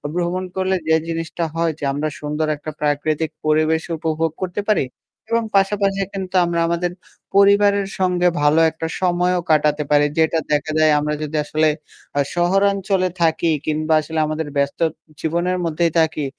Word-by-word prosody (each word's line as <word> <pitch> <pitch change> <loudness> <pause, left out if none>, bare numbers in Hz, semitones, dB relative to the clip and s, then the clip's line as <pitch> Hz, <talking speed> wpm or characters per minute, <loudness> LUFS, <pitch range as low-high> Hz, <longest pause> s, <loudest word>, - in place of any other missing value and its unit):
ভ্রমণ 180 +1 -1
করলে 190 0 0
যে 160 - +4
জিনিসটা 165 +1 -3
হয় 165 -1 +1
যে - - -9
আমরা 150 +2 -1
সুন্দর 150 +1 -2
একটা 155 +2 -7
প্রাকৃতিক 150 +1 0 0.2
পরিবেশ 155 +1 +2 0.2
উপভোগ 160 0 -1
করতে 185 +3 -2
পারি 205 -10 +3 0.5
এবং 230 0 +2
পাশাপাশি 195 0 +2
কিন্তু 190 -1 -5
আমরা 170 0 -1
আমাদের 170 +1 -1 0.4
পরিবারের 200 0 +4
সঙ্গে 180 -1 +2
ভালো 150 +2 +4
একটা 160 0 -5
সময়ও 180 0 +1
কাটাতে 150 0 +2
পারি। 145 0 +5
যেটা 160 0 +3
দেখা 150 +1 0
যায় 155 -1 +5
আমরা 150 +1 -1
যদি 155 +1 -5
আসলে 155 +1 +1 0.5
আ - - +3 0.2
শহরাঞ্চলে 195 +1 +2
থাকি 165 0 +2 0.2
কিংবা 155 +1 0
আসলে 160 +1 -4
আমাদের 155 0 -3
ব্যস্ত 140 +2 0 0.4
জীবনের 175 +3 -1
মধ্যেই 165 0 +1
থাকি 155 -2 +1
165 Hz, 155 wpm, -20 LUFS, 155-185 Hz, 0.5 s, পারি